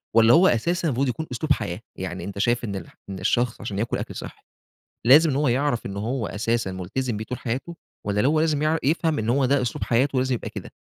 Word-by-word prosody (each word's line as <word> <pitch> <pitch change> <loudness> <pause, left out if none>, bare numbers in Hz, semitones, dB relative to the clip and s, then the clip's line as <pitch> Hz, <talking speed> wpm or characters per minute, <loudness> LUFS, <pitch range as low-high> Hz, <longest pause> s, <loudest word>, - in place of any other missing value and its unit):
والّا 115 0 +7
هو 180 +3 +7
أساسًا 170 +9 +1
المفروض 135 -1 +1
يكون 155 +6 -3
أسلوب 145 +5 +1
حياة؟ 95 -5 -4 0.2
يعني 90 -1 -5
أنت 100 0 -6
شايف 120 +3 +1
إن 100 -4 -3
الح 95 - -8
إن 95 - -5
الشخص 120 -1 0
عشان 100 -1 -4
ياكل 115 - -1
أكل - - -6
صحّي، - - -8 0.6
لازم 150 +6 +7
إن 135 - -1
هو 145 0 +2
يعرف 130 0 0
إن 100 - -6
هو 115 +3 -2
أساسًا 115 -1 -1
ملتزم 105 +7 -3
بيه 110 - -4
طول 125 +3 -5
حياته؟ 135 +9 -4 0.3
والّا 105 +3 +1
هو 155 +1 +2
لازم 155 -2 +1
يع 155 +1 +2
يفهم 160 +2 +1
إن 110 0 -2
هو 135 +3 +3
ده 135 0 +2
أسلوب 120 - -2
حياته 130 +3 +2
لازم 130 0 +1
يبقى 120 - -5
كده؟ - - -8
125 Hz, 230 wpm, -24 LUFS, 110-145 Hz, 0.6 s, والّا